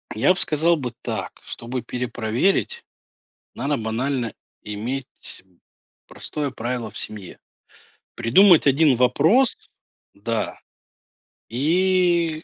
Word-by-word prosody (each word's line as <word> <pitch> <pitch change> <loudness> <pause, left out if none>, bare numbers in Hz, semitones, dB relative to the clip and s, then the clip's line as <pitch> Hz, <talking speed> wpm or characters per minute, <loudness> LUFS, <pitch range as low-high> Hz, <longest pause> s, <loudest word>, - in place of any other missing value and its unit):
я 115 +12 +4
б 185 - -6
сказал 165 0 +2
бы 125 -5 -5
так: - - -5
чтобы 120 +2 -5
перепроверить, 125 - -1 0.7
надо 145 +1 -1
банально 120 +2 -2 0.3
иметь 115 +2 -6 0.6
простое 145 -2 -4
правило 120 -1 -4
в - - -10
семье. 100 -4 -6 0.8
Придумать 160 - +5
1 140 -1 +4
вопрос, 160 - +3 0.6
да, 110 +1 -3 0.9
и 170 +3 +2
135 Hz, 90 wpm, -22 LUFS, 115-165 Hz, 0.9 s, Придумать